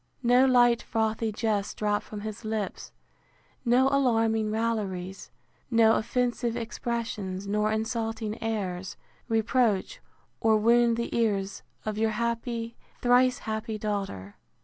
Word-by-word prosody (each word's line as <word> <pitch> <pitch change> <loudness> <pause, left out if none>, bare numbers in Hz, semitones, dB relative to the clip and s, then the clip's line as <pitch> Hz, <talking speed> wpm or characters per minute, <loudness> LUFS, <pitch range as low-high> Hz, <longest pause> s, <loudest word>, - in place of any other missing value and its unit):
No 245 +2 +5
light 240 -2 +5
frothy 220 0 -1
jests 210 -2 -1
drop 210 -1 0
from 210 -1 -8
his 215 +1 -6
lips; 215 -3 -4 0.7
no 250 +2 +4
alarming 225 -5 +2
railleries; 205 -4 -2 0.4
no 225 -2 +5
offensive 240 0 0
expressions, 225 -5 -4
nor 210 +1 +1
insulting 225 0 -2
airs, 190 -5 -3 0.3
reproach 225 - +1 0.4
or 220 -1 +4
wound 235 +1 +4
the 235 - -3
ears 200 -4 0 0.2
of 215 0 -2
your 225 0 +2
happy, 235 0 -2 0.2
thrice 250 +1 +4
happy 220 0 -3
daughter. 195 - -4
225 Hz, 115 wpm, -27 LUFS, 210-235 Hz, 0.7 s, No